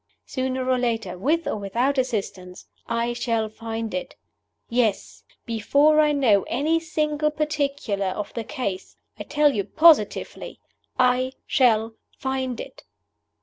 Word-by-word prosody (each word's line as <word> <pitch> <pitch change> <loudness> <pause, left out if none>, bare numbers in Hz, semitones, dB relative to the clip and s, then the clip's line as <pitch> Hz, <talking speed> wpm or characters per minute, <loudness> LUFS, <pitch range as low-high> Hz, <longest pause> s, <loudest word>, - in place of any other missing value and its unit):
Sooner 260 -1 -2
or 255 -1 +2
later, 225 -7 -1
with 300 - 0
or - - -2
without 240 +8 0
assistance, 195 -7 -4 0.2
I 235 +1 -1
shall 230 -2 -1
find 225 0 -5
it. 185 - -4 0.5
Yes! 230 -4 -1 0.2
before 280 +7 +3
I 300 -1 +4
know 245 -9 +3
any 310 +6 +1
single 305 -2 0
particular 285 -9 -2
of 195 +3 -4
the 230 - -4
Case, 200 -5 -5 0.2
I - - -4
tell 295 -1 +3
you 205 - 0
positively 310 - +3 0.4
I 255 +1 +2
shall 225 -4 +2 0.2
find 260 -2 -3
it! - - -9
250 Hz, 130 wpm, -24 LUFS, 220-285 Hz, 0.5 s, I